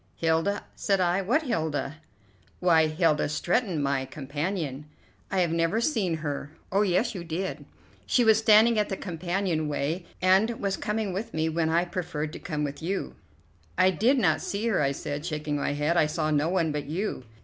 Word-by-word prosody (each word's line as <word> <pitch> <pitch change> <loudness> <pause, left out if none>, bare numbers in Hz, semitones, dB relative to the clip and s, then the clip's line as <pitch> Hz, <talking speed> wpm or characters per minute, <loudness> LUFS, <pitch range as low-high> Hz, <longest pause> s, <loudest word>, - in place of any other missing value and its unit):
"Hilda!" 165 +5 0
said 195 -2 +1
I. 180 +1 +2
"What 245 - +1
Hilda?" 155 - -2 0.6
"Why, 165 -3 +4
Hilda 155 -1 +1
Stretton, 175 +3 0
my 140 -1 0
companion." 145 +1 -4 0.4
"I 190 -1 +1
have 170 -2 +1
never 165 +5 +1
seen 220 - 0
her." 145 -1 -3 0.2
"Oh, 195 +2 +3
yes, 210 +4 +1
you 180 -4 -6
did; 175 +3 -4 0.4
she 245 - +3
was 220 -1 +5
standing 220 +1 +5
at 210 - 0
the 195 - -2
companion 175 -2 -2
way 150 +4 -2
and 195 +5 +3
was 195 -1 -1
coming 210 -2 -2
with 200 +1 -5
me 160 0 +1
when 160 0 0
I 170 +2 +2
preferred 170 -4 -4
to - - -7
come 150 -3 -3
with 145 +1 -4
you." 190 +4 -3 0.6
"I 185 - +5
did 230 - +2
not 245 - +2
see 205 +3 -3
her," 210 - +2
I 140 -1 +2
said, 145 +1 -4
shaking 150 -3 -3
my 145 - -1
head; 150 +3 0
"I 155 -3 +4
saw 155 0 -1
no 150 +2 +2
one 170 -4 +1
but 150 -1 -3
you." 165 -4 -3
170 Hz, 185 wpm, -27 LUFS, 155-195 Hz, 0.6 s, was